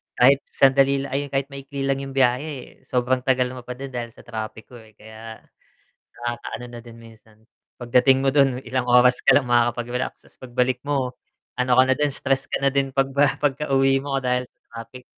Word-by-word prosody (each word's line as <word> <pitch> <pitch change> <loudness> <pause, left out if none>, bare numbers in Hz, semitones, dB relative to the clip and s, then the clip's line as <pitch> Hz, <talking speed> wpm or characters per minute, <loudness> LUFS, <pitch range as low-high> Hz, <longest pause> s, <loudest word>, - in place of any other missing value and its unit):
kahit 135 +3 +5
sandali 135 0 +3
la - - -7
ay, 145 +1 -1
'yon - - -19
kahit 135 0 0
maikli 140 0 -6
lang 135 0 0
'yong 135 0 -8
biyahe, 130 +2 +2
eh, 140 -5 -8
sobrang 125 0 0
tagal 125 -1 +1
mo 125 - -8
pa 125 +1 -8
din 135 0 -7
dahil 120 -1 -4
sa - - -16
trapik 110 -1 -7
ho, 120 - -10
eh, 110 -2 -20
kaya 110 +1 -11 0.8
nakakaano 120 +1 -5
na 120 -1 -9
din 115 -1 -13
minsan. 110 -1 -18 0.4
Pagdating 130 +2 +3
mo 135 - +3
doon, 135 -3 +2
ilang 125 +1 -2
oras 125 0 +5
ka - - +7
lang 130 -4 +1
makakapag-relax, 120 +1 0
'tas - - -21
pagbalik 125 0 -1
mo, 135 -3 -1 0.5
ano 125 0 +1
ka 130 - +7
na 130 - +5
din, 150 -1 +1
stress 135 0 0
ka - - -3
na 140 - +4
din 135 -1 -1
pagba 135 +1 +2
pagkauwi 135 -1 +2
mo 135 -1 -3
dahil 125 0 0
sa - - -54
trapik. 115 +2 -10
130 Hz, 200 wpm, -23 LUFS, 120-135 Hz, 0.8 s, ka